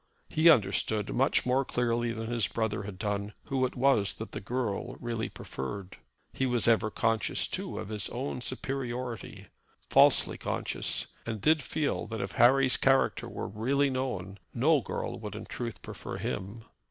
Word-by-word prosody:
He 160 +2 +5
understood 105 -4 +3
much 135 +3 +3
more 130 +2 +3
clearly 120 -2 0
than 115 0 -4
his 115 -2 +1
brother 110 -2 -1
had 100 -2 -7
done 100 +2 -2
who 130 -2 +1
it - - -12
was 125 -6 +3
that 110 -3 -7
the - - -5
girl 120 +2 -2
really 115 -2 -3
preferred. 90 +9 -6 0.4
He 135 - 0
was 120 -2 +2
ever 110 -2 +4
conscious, 110 -3 0
too, - - -4
of - - -5
his 105 -1 -2
own 125 0 -4
superiority, 125 -3 -4 0.4
falsely - - +5
conscious, - - -1 0.2
and 110 -2 -4
did 155 +8 +3
feel 150 +1 -1
that 110 0 -5
if 100 0 -3
Harry's 130 +2 +5
character 135 0 +2
were - - -5
really 135 +6 +1
known, 105 -7 -3 0.2
no 145 +4 +4
girl - - -4
would 105 -2 -6
in 105 - -6
truth 120 -2 -6
prefer - - -6
him. 105 +4 -4
115 Hz, 165 wpm, -30 LUFS, 105-130 Hz, 0.4 s, He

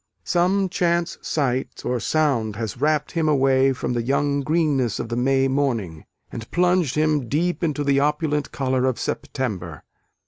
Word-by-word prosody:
Some 190 +2 +2
chance 170 -1 0
sight 135 -4 -2
or 125 -1 0
sound 120 -6 0
has 115 +2 -5
wrapt 150 0 +1
him 165 -3 0
away 135 -2 +3
from 130 -1 -3
the 120 - 0
young 140 +3 0
greenness 145 -6 +1
of 115 - -4
the 120 - -2
May 135 +2 +2
morning, 120 - -1 0.3
and 115 -1 -7
plunged 180 -5 +2
him 150 -5 +1
deep 175 +5 0
into 150 -3 0
the 140 -1 +2
opulent 150 0 0
colour 130 -1 0
of 130 - 0
September. 95 - -4
140 Hz, 160 wpm, -23 LUFS, 125-155 Hz, 0.3 s, away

